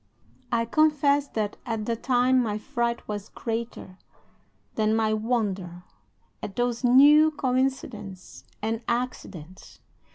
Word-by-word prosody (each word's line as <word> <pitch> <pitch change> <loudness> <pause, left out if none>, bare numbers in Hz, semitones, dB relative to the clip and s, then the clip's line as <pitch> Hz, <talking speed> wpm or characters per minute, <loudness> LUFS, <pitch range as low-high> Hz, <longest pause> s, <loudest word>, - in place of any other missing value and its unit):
"I 230 -1 +1
confess 290 +1 +2
that 215 -5 -3
at 225 -3 -3
the 230 - -1
time 250 +2 +2
my 210 -3 -1
fright 235 +2 -3
was 205 -1 -5
greater 225 -5 -5 0.7
than 215 0 +1
my 220 -1 +1
wonder 200 -6 -2 0.6
at 195 - -6
those 245 0 -1
new 290 +5 +7
COINCIDENCES 250 - -3 0.2
and 225 +1 -1
ACCIDENTS. 195 -8 -5
230 Hz, 110 wpm, -26 LUFS, 210-255 Hz, 0.7 s, new